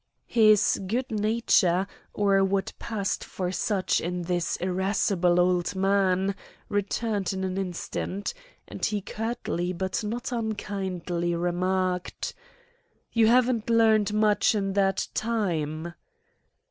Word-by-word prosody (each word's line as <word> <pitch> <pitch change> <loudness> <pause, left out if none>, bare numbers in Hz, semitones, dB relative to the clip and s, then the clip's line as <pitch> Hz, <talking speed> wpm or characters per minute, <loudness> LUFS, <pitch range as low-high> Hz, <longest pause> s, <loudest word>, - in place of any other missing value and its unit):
His 215 -4 +4
good 250 +6 -2
nature, 210 -4 +2 0.3
or 195 -1 +3
what 195 0 0
passed 205 -4 -2
for 180 -1 -4
such 190 -1 0
in 180 +1 -3
this 175 0 -1
irascible 185 -1 +1
old 180 +1 +2
man, 195 0 +2 0.4
returned 205 0 -1
in 190 0 -3
an 185 -1 -2
instant; 190 +1 -3 0.3
and - - -9
he 210 - +1
curtly 205 -4 -3
but 190 +4 -2
not 230 +4 -3
unkindly 190 -6 -2
remarked: 180 +1 -1 0.8
"You 230 -1 +4
haven't 240 -1 +3
learned 220 -2 +4
much 210 +1 +3
in 195 -2 -1
that 195 -1 +1
time." 170 -8 -2
195 Hz, 110 wpm, -26 LUFS, 180-215 Hz, 0.8 s, His